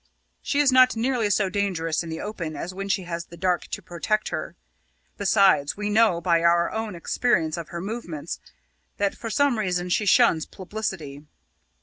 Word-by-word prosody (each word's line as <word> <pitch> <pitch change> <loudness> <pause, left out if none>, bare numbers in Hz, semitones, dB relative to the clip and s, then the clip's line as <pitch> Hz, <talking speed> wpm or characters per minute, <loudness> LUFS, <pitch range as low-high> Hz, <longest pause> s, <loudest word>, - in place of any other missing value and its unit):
She 280 - -2
is 290 -2 +4
not 255 -1 +6
nearly 230 -2 0
so 200 0 +2
dangerous 180 -5 -1
in 170 - -7
the 160 - -5
open 170 -7 -5
as 180 - -5
when 195 +1 -5
she 190 - 0
has 170 -1 -5
the 170 - -13
dark 180 -1 0
to - - -6
protect 210 +5 -1
her. - - -5 0.6
Besides, 195 -7 +3
we 210 0 -2
know, 215 -5 +4
by 170 -1 +2
our 170 0 +3
own 220 -3 -4
experience 170 -2 0
of 170 -1 -7
her 170 - -5
movements, 175 -7 -5 0.6
that 200 -1 +1
for 230 - -6
some 260 +1 +2
reason 180 -3 -1
she 205 +3 +1
shuns 225 -8 +4
publicity. 180 -8 -6
190 Hz, 180 wpm, -25 LUFS, 170-215 Hz, 0.6 s, not